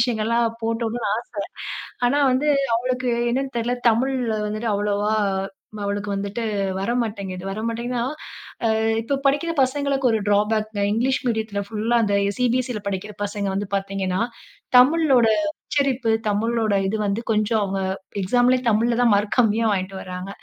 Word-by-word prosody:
விஷயங்கள்லாம் 230 0 +1 0.2
போட்டுடணும்னு 230 -1 -1 0.7
ஆச. - - -11 0.2
ஆனா 280 +4 +2
வந்து 285 +4 +1 0.3
அவளுக்கு 250 +1 -1 0.2
என்னன்னு 265 +1 -2
தெர்ல, 235 +1 0 0.2
தமிழ் 250 +4 +2 0.3
வந்துட்டு 215 +2 -3
அவ்வளவா, 205 +1 0 0.7
அவளுக்கு 205 0 -2
வந்துட்டு 200 +3 -3 0.4
வரமாட்டேங்குது. 200 -5 -2
வரமாட்டேங்குதுன்னா 235 +3 -2 0.8
அ - - 0 0.2
இப்ப 275 +4 -1
படிக்கிற 290 +5 +1
பசங்களுக்கு 270 -1 +1
ஒரு 220 - +1
டிராபேக்ங்க. 210 0 +1
இங்கிலீஷ் 260 +4 +1
மீடியத்துல 220 -3 -1
ஃபுல்லா 225 +2 +1
அந்த 205 -1 +1 0.2
சிபிஎஸ்சில 250 -2 0
படிக்கிற 200 +2 -4
பசங்க 205 0 -3
வந்து 200 0 -3
பாத்தீங்கன்னா, 195 -1 -1 0.6
தமிழோட 270 -3 +5 0.2
உச்சரிப்பு, 270 -6 -1 0.2
தமிழோட 220 +1 +1
இது 215 +3 -1
வந்து 200 +4 -1
கொஞ்சம் 215 +1 +1
அவங்க 195 0 -2 0.4
எக்ஸாம்லயே 250 +5 +3
தமிழ்லதான் 235 +1 +3
மார்க் 205 +4 0
கம்மியா 225 -1 +3
வாங்கிட்டு 190 0 -3
வர்றாங்க. 185 +1 -6
225 Hz, 125 wpm, -23 LUFS, 205-245 Hz, 0.8 s, தமிழோட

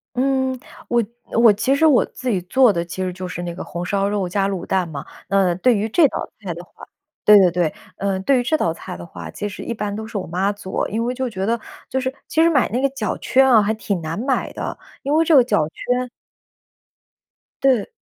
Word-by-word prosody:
嗯， 260 0 0 0.3
我 240 -1 +3 0.4
我 230 -3 +7
其 235 +6 +1
实 280 +3 +3
我 290 -6 +5
自 255 - -5
己 195 -6 +1
做 250 +6 +4
的 170 -2 -1
其 175 +2 -6
实 185 -1 -2
就 185 0 -6
是 175 - -5
那 175 -1 -5
个 - - -6
红 175 +1 -5
烧 200 +1 0
肉 205 -3 -1
加 195 +2 0
卤 190 -3 -4
蛋 185 -2 0
嘛。 145 -3 -7 0.2
那 195 -3 +3
对 240 +7 +3
于 210 +2 -1
这 300 +8 +4
道 - - -5
菜 185 -4 -4
的 170 - -8
话 - - -14 0.4
对 210 0 +8
对 185 -2 +6
对， 170 -2 0 0.2
呃， 195 -1 -1
对 260 +6 +3
于 - - 0
这 310 +6 +1
道 165 - 0
菜 165 - -8
的 85 - -9
话， 85 -2 -9
其 205 - -4
实 200 - -7
一 235 - -3
般 210 -2 -3
都 220 +1 -5
是 220 - -5
我 190 - -4
妈 185 +4 0
做。 200 -2 -3
因 225 +3 -1
为 245 - -1
就 260 0 -2
觉 195 -4 -3
得 230 +3 +1 0.3
就 265 - -1
是 260 0 -2
其 320 - +2
实 335 - +5
买 275 -6 +3
那 250 +3 -1
个 275 - +2
脚 255 -6 -3
圈 265 +1 +3
啊， 230 -4 +7
还 210 +1 +1
挺 205 -4 -3
难 160 +3 -4
买 260 +2 -1
的， - - -5 0.3
因 280 - 0
为 320 +2 +4
这 330 - +2
个 260 - +8
脚 235 -10 +1
圈 250 +8 -2 1.5
对。 265 - +3
210 Hz, 260 characters per minute, -21 LUFS, 185-255 Hz, 1.5 s, 对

